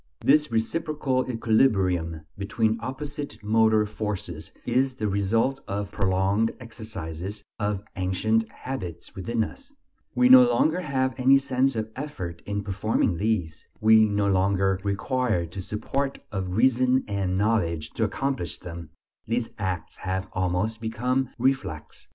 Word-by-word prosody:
This 150 Hz, 0 st, +4 dB
reciprocal 130 Hz, +2 st, 0 dB
equilibrium 95 Hz, -9 st, +2 dB
between 110 Hz, +3 st, 0 dB
opposite 145 Hz, +2 st, -5 dB
motor 110 Hz, 0 st, +4 dB
forces 105 Hz, -6 st, -5 dB
is 130 Hz, +2 st, +1 dB
the 110 Hz, -3 st, -2 dB
result 110 Hz, +7 st, +1 dB
of 100 Hz, 0 st, -3 dB
prolonged 100 Hz, +3 st, +1 dB
exercises, 105 Hz, -5 st, -7 dB, 0.2 s
of 105 Hz, -2 st, -1 dB
ancient 110 Hz, +4 st, +1 dB
habits 95 Hz, -13 st, -7 dB
within 115 Hz, +4 st, -1 dB
us; 275 Hz, -, -9 dB, 0.4 s
we 250 Hz, -, +5 dB
no 255 Hz, 0 st, +10 dB
longer 165 Hz, -6 st, +2 dB
have 130 Hz, -5 st, 0 dB
any 135 Hz, +2 st, +6 dB
sense 135 Hz, -1 st, +1 dB
of 110 Hz, 0 st, -3 dB
effort 95 Hz, -, -6 dB
in 100 Hz, 0 st, -2 dB
performing 100 Hz, -2 st, 0 dB
these, 90 Hz, -6 st, -1 dB
we 110 Hz, 0 st, +6 dB
no 105 Hz, 0 st, +1 dB
longer 95 Hz, 0 st, +2 dB
require 105 Hz, -1 st, 0 dB
the 85 Hz, +4 st, -7 dB
support 135 Hz, +8 st, -2 dB
of 95 Hz, -2 st, -3 dB
reason 130 Hz, +1 st, +3 dB
and 95 Hz, -2 st, -1 dB
knowledge 95 Hz, -7 st, 0 dB
to -, -, -1 dB
accomplish 135 Hz, -10 st, -2 dB
them; 85 Hz, -2 st, -8 dB, 0.4 s
these 115 Hz, +1 st, -1 dB
acts 95 Hz, -5 st, -3 dB
have 95 Hz, 0 st, -3 dB
almost 95 Hz, +5 st, -1 dB
become 125 Hz, +4 st, 0 dB
reflex. 115 Hz, -, -2 dB
110 Hz, 130 wpm, -26 LUFS, 95-130 Hz, 0.4 s, no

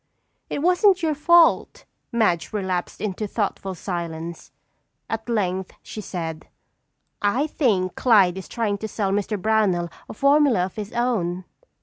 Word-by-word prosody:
"It 285 Hz, -, -3 dB
wasn't 365 Hz, +1 st, +4 dB
your 315 Hz, -1 st, +2 dB
fault." 335 Hz, +3 st, +3 dB, 0.3 s
Madge 215 Hz, -8 st, +1 dB
relapsed 185 Hz, -4 st, -3 dB
into 210 Hz, 0 st, -3 dB
thoughtful 195 Hz, -2 st, -3 dB
silence. 170 Hz, -2 st, -5 dB, 0.6 s
At 225 Hz, +1 st, -4 dB
length 190 Hz, -4 st, -1 dB
she 215 Hz, -, -7 dB
said: 165 Hz, -5 st, -5 dB, 0.7 s
"I 225 Hz, +8 st, +2 dB
think 210 Hz, -, 0 dB
Clyde 195 Hz, -7 st, +4 dB
is 190 Hz, -, -9 dB
trying 210 Hz, -4 st, -2 dB
to 220 Hz, -, -4 dB
sell 200 Hz, -2 st, -2 dB
Mr. 205 Hz, +1 st, -1 dB
Brownell 185 Hz, -5 st, +1 dB, 0.2 s
a -, -, -7 dB
formula 275 Hz, -7 st, +4 dB
of 185 Hz, -, -9 dB
his 210 Hz, -1 st, -6 dB
own." 185 Hz, -7 st, -1 dB
205 Hz, 135 wpm, -23 LUFS, 185-240 Hz, 0.7 s, wasn't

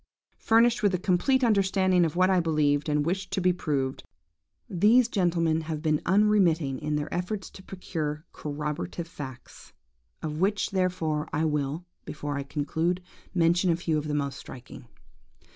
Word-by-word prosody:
Furnished 230 Hz, +1 st, +3 dB
with 200 Hz, -3 st, +2 dB
a -, -, +1 dB
complete 195 Hz, +9 st, +2 dB
understanding 190 Hz, -5 st, +3 dB
of 160 Hz, -, -3 dB
what 185 Hz, +1 st, +4 dB
I 185 Hz, -, +4 dB
believed 150 Hz, -3 st, +1 dB
and 150 Hz, 0 st, +1 dB
wished 190 Hz, +3 st, -2 dB
to 195 Hz, -, +1 dB
be 180 Hz, 0 st, +3 dB
proved, 140 Hz, -6 st, -2 dB, 0.6 s
these 220 Hz, +7 st, +4 dB
gentlemen 170 Hz, -6 st, +1 dB
have 155 Hz, -1 st, -5 dB
been 155 Hz, -2 st, +1 dB
unremitting 180 Hz, -8 st, +3 dB
in 150 Hz, 0 st, -2 dB
their 150 Hz, 0 st, -3 dB
efforts 185 Hz, +3 st, -3 dB
to -, -, -12 dB
procure 160 Hz, -5 st, -5 dB
corroborative 150 Hz, -, -4 dB
facts; 130 Hz, -7 st, -10 dB, 0.5 s
of 155 Hz, 0 st, -4 dB
which, 205 Hz, +2 st, +1 dB
therefore, 175 Hz, -5 st, -1 dB
I 155 Hz, +2 st, 0 dB
will, 150 Hz, +2 st, -2 dB, 0.2 s
before 145 Hz, -1 st, -5 dB
I 140 Hz, -, -2 dB
conclude, 160 Hz, +5 st, -2 dB, 0.3 s
mention 175 Hz, +1 st, +3 dB
a 165 Hz, -, +3 dB
few 165 Hz, -2 st, -1 dB
of 150 Hz, -, -6 dB
the 150 Hz, -, -1 dB
most 140 Hz, -2 st, -2 dB
striking. 125 Hz, -1 st, -11 dB
165 Hz, 160 wpm, -27 LUFS, 150-185 Hz, 0.6 s, what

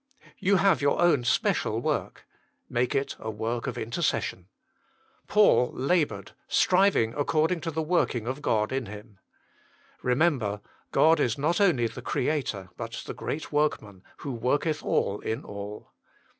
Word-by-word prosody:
You 200 Hz, +2 st, +3 dB
have 190 Hz, -7 st, +3 dB
your 140 Hz, 0 st, +2 dB
own 170 Hz, -7 st, +4 dB
special 120 Hz, -, +1 dB
work; -, -, -3 dB, 0.4 s
make 120 Hz, +1 st, 0 dB
it 135 Hz, -, -1 dB
a 110 Hz, -, -5 dB
work 115 Hz, +4 st, -3 dB
of 125 Hz, -, -4 dB
inter 115 Hz, +9 st, -4 dB
cession. 90 Hz, -, -1 dB, 0.8 s
Paul 205 Hz, -12 st, +4 dB
laboured, 150 Hz, +3 st, 0 dB, 0.2 s
striving 185 Hz, -, +3 dB
according 155 Hz, +3 st, +1 dB
to 165 Hz, -, -3 dB
the 160 Hz, 0 st, -2 dB
working 155 Hz, -8 st, 0 dB
of 130 Hz, +4 st, -4 dB
God 105 Hz, -6 st, +1 dB
in 130 Hz, -2 st, -2 dB
him. 105 Hz, 0 st, -11 dB, 0.8 s
Remember, 125 Hz, -6 st, +1 dB, 0.3 s
God 160 Hz, +1 st, +5 dB
is 115 Hz, -, +1 dB
not 165 Hz, +7 st, +1 dB
only 165 Hz, -12 st, +3 dB
the 115 Hz, -, -5 dB
Creator, 120 Hz, -10 st, -2 dB
but 115 Hz, 0 st, -6 dB
the -, -, -5 dB
Great 155 Hz, -, -5 dB
Workman, 125 Hz, -10 st, -1 dB, 0.2 s
who 140 Hz, -, -5 dB
worketh 145 Hz, +6 st, 0 dB
all 100 Hz, -, 0 dB
in 110 Hz, -, -3 dB
all. 100 Hz, +1 st, -8 dB
130 Hz, 145 wpm, -27 LUFS, 110-160 Hz, 0.8 s, God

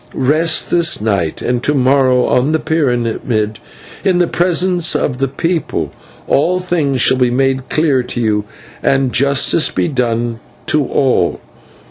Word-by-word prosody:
Rest 155 Hz, +5 st, +1 dB
this 170 Hz, -4 st, +2 dB
night; 100 Hz, -7 st, -2 dB
and 120 Hz, 0 st, -1 dB
to 145 Hz, -, 0 dB
morrow 130 Hz, -1 st, +3 dB
on 135 Hz, +5 st, +1 dB
the 160 Hz, -, +1 dB
pyramid, 120 Hz, -8 st, -1 dB, 0.4 s
in 185 Hz, -2 st, +2 dB
the 175 Hz, -, +3 dB
presence 175 Hz, 0 st, +1 dB
of 130 Hz, -3 st, -1 dB
the 135 Hz, -, +1 dB
people, 165 Hz, +4 st, -2 dB, 0.4 s
all 175 Hz, +6 st, +2 dB
things 160 Hz, -7 st, -1 dB
shall 130 Hz, +2 st, +3 dB
be 125 Hz, -1 st, +2 dB
made 130 Hz, +1 st, 0 dB
clear 150 Hz, -5 st, +1 dB
to 125 Hz, 0 st, -5 dB
you, 105 Hz, -3 st, 0 dB, 0.4 s
and 135 Hz, -2 st, +1 dB
justice 140 Hz, +4 st, +2 dB
be -, -, -1 dB
done 120 Hz, -4 st, -2 dB, 0.3 s
to 150 Hz, -1 st, +1 dB
all. 135 Hz, -2 st, +1 dB
135 Hz, 145 wpm, -15 LUFS, 125-160 Hz, 0.4 s, morrow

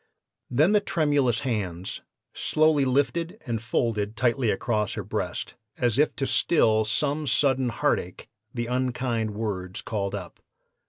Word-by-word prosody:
Then 150 Hz, +9 st, +3 dB
the 210 Hz, -, +5 dB
tremulous 145 Hz, -, +1 dB
hands 95 Hz, -8 st, -3 dB, 0.3 s
slowly 155 Hz, -2 st, +2 dB
lifted 165 Hz, -, 0 dB
and 115 Hz, -4 st, -2 dB
folded 110 Hz, -2 st, -1 dB
tightly 120 Hz, 0 st, +2 dB
across 105 Hz, 0 st, 0 dB
her -, -, -4 dB
breast, -, -, -3 dB, 0.2 s
as 120 Hz, 0 st, +1 dB
if 150 Hz, -, +3 dB
to 135 Hz, -, -1 dB
still 110 Hz, -8 st, +3 dB
some 145 Hz, +6 st, 0 dB
sudden 130 Hz, -1 st, +2 dB
heartache 115 Hz, -, -1 dB, 0.2 s
the 120 Hz, -1 st, -3 dB
unkind 120 Hz, -3 st, -1 dB
words 100 Hz, -2 st, -4 dB
called 100 Hz, -2 st, -2 dB
up. 90 Hz, -4 st, -8 dB
120 Hz, 130 wpm, -26 LUFS, 110-140 Hz, 0.3 s, the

